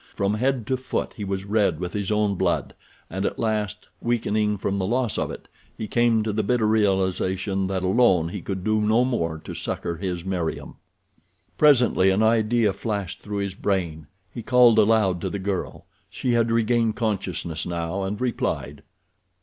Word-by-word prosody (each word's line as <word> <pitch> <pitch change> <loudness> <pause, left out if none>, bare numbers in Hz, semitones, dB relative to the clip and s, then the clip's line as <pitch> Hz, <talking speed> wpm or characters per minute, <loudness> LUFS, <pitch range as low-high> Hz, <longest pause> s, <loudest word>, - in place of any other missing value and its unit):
From 100 +1 0
head 125 +1 0
to 130 +2 0
foot 130 +1 -3
he 105 - -6
was 95 0 -3
red 100 -6 +1
with 90 -1 -4
his 100 -1 -2
own 105 -1 +2
blood, 95 - -1 0.3
and 95 +3 -4
at - - -2
last, 110 -4 -2
weakening 110 -3 0
from 100 +1 -2
the 95 - -1
loss 120 0 0
of - - -1
it, - - -9 0.3
he 110 - -4
came 120 -1 +2
to 110 -1 -2
the 110 - +1
bitter 110 +2 +1
realization 95 -2 +1
that 95 -1 -2
alone 95 -4 +3
he 95 +1 -6
could 95 +1 -4
do 110 +1 +1
no 110 +4 +3
more 85 -11 -1
to - - -6
succor 85 - -4
his 90 -1 -4
Meriem. 90 -4 -3 0.8
Presently 125 -10 +4
an 95 +3 +2
idea 110 -1 +3
flashed 100 -2 -4
through 105 0 -5
his 100 - -5
brain. 85 -6 -2 0.3
He 120 - -5
called 125 -1 +5
aloud 105 -5 +3
to - - -2
the - - -3
girl. 95 -1 -4 0.2
She 125 - -2
had 115 -1 +2
regained 115 -1 +2
consciousness 95 -7 -2
now 85 +2 -3
and 100 +2 -3
replied. 125 -2 -2
105 Hz, 175 wpm, -24 LUFS, 95-115 Hz, 0.8 s, called